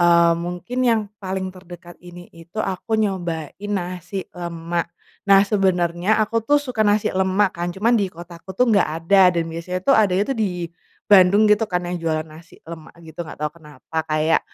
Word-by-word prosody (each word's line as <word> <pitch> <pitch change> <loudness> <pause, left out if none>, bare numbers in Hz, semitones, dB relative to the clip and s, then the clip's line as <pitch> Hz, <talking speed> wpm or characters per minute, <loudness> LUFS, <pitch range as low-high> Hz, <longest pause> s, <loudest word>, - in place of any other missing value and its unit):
eee 170 -1 +5
mungkin 175 +8 -5
yang 235 -3 +3 0.2
paling 190 -1 -4
terdekat 175 -1 -13
ini 175 0 -12
itu 165 +4 -16
aku 215 +1 -2
nyobain 175 -7 -2 0.2
nasi 180 -1 -4
lemak, 170 -1 -4 0.4
nah 195 0 +7
sebenernya 185 -1 +1
aku 230 +2 -1
tuh 290 +7 +2
suka 255 -6 -3
nasi 210 0 +2
lemak 190 +1 +1
kan 175 +1 -4
cuman 205 +7 0
di 205 -5 +2
kota 170 0 -12
aku 190 +1 -11
tuh 250 - +4
gak 200 -7 +3 0.2
ada 190 +1 +6
dan 170 -2 0
biasanya 170 +3 -5
tuh 275 - +4
adanya 205 +2 +2
tuh 245 - -7
di, 180 -5 -2 0.4
Bandung 200 +2 +6
gitu 210 +1 +3
kan 180 -1 -1
yang 175 0 -3
jualan 155 -1 -1
nasi 160 +1 -15
lemak 160 -1 -11
gitu 160 +1 -10
gak 165 - -7
tau 150 0 -3
kenapa 160 -1 -6
kayak, 155 +1 +2
180 Hz, 180 wpm, -21 LUFS, 170-200 Hz, 0.4 s, nah